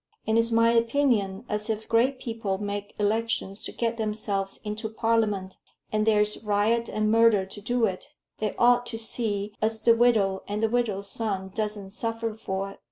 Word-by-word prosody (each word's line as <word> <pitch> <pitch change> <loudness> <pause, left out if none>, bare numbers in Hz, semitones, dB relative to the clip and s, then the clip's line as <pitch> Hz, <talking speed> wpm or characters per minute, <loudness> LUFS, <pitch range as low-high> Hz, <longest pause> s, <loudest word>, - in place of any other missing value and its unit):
And 220 - +1
it's 230 0 +3
my 230 0 +4
opinion 230 -5 +1
as 210 +1 -3
if 220 0 -2
great 245 +4 +2
people 225 -6 -3
make 205 0 -5
elections 210 -1 -1
to - - -4
get 230 -1 -2
themselves 210 -3 -2
into 215 +1 -4
Parliament, 215 -4 0 0.3
and 215 0 +1
there's 210 0 +2
riot 215 +3 +1
and 215 0 0
murder 225 -3 +5
to 200 +2 -9
do 240 +2 +1
it, 185 -3 -4 0.3
they 215 -2 -2
ought 245 0 +4
to 225 - -4
see 215 -3 -2
as 220 0 -1
the 230 - +7
widow 215 -5 +3
and 210 +2 -2
the 225 - +3
widow's 215 -5 -1
son 195 -4 -3
doesn't 210 -3 -3
suffer 225 +1 -3
for 195 -2 -4
it. - - -15
215 Hz, 175 wpm, -26 LUFS, 205-230 Hz, 0.3 s, the